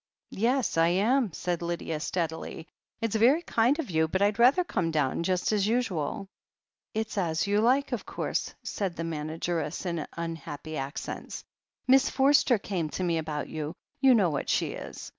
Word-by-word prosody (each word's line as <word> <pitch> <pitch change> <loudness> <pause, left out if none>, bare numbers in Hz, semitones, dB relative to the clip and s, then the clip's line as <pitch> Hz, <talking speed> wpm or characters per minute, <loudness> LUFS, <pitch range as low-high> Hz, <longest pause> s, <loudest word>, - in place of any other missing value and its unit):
"Yes, 240 0 +1
I 165 - +5
am," 215 +6 +2
said 175 +1 -2
Lydia 170 -2 -3
steadily. 160 -1 -3 0.3
"It's 230 -2 -1
very 260 +10 +4
kind 240 +2 +2
of 305 - -4
you, 160 -1 +2
but 190 +4 -1
Fd 205 +1 +2
rather 260 +9 +6
come 180 - -1
down 150 -2 0
just 180 +3 0
as 205 -2 +2
usual." 200 - -1 0.7
"It's 220 -1 -2
as 160 -2 0
you 205 +1 +2
like, 260 +5 +3
of - - -2
course," - - -3
said 190 -4 -3
the 165 - -4
manageress 160 +1 -3
in 170 -3 -2
tmhappy 160 -2 -5
accents. 135 0 -5 0.4
"Miss 265 +1 +5
Forster 270 -2 +4
came 180 -6 -3
to 185 - -3
me 170 -2 +1
about 150 -2 -3
you 155 +1 -5
— - - -38
^you 265 -2 +7
know 190 -7 +3
what 145 - -3
she - - +1
is. - - -8
180 Hz, 175 wpm, -28 LUFS, 160-230 Hz, 0.7 s, ^you